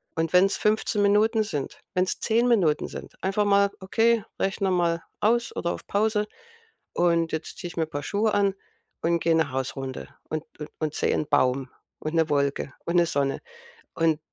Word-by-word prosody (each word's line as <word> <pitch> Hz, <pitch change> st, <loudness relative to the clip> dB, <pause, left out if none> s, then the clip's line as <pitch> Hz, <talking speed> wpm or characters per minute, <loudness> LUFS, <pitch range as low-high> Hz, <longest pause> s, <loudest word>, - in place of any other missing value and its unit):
und 165 Hz, +1 st, -1 dB
wenn's 190 Hz, +2 st, +5 dB
15 210 Hz, -1 st, +1 dB
Minuten 215 Hz, +2 st, +3 dB
sind, 145 Hz, -9 st, -4 dB
wenn's 185 Hz, 0 st, 0 dB
10 235 Hz, +2 st, +2 dB
Minuten 180 Hz, -11 st, +2 dB
sind, -, -, -9 dB
einfach 195 Hz, +2 st, +1 dB
mal, 200 Hz, 0 st, +4 dB
okay, 225 Hz, +3 st, +2 dB, 0.2 s
Rechner 195 Hz, 0 st, 0 dB
mal 170 Hz, -2 st, +1 dB, 0.2 s
aus 235 Hz, +2 st, +1 dB
oder 170 Hz, -, -1 dB
auf -, -, -9 dB
Pause 210 Hz, 0 st, +1 dB, 0.7 s
und 170 Hz, -2 st, +2 dB
jetzt 160 Hz, -, -4 dB
ziehe 175 Hz, -, -4 dB
ich 170 Hz, -, -13 dB
mir 165 Hz, -, +2 dB
'n 160 Hz, -, -23 dB
paar 145 Hz, -, -3 dB
Schuhe 210 Hz, +4 st, 0 dB
an 200 Hz, -1 st, +2 dB, 0.5 s
und 170 Hz, +1 st, +2 dB
gehe 165 Hz, 0 st, +2 dB
'ne 160 Hz, -4 st, +1 dB
Hausrunde 135 Hz, 0 st, -4 dB, 0.2 s
und 155 Hz, 0 st, -3 dB, 0.2 s
und 150 Hz, -, -6 dB
und 155 Hz, -1 st, -2 dB
sehe -, -, +1 dB
'n 150 Hz, -, -1 dB
Baum 130 Hz, -2 st, +2 dB, 0.3 s
und 155 Hz, +2 st, -4 dB
'ne 160 Hz, -1 st, +2 dB
Wolke 140 Hz, -1 st, 0 dB
und 170 Hz, -, -1 dB
'ne 175 Hz, -, +5 dB
Sonne. 140 Hz, -3 st, -1 dB, 0.5 s
Und 160 Hz, -2 st, +2 dB
175 Hz, 185 wpm, -26 LUFS, 155-205 Hz, 0.7 s, wenn's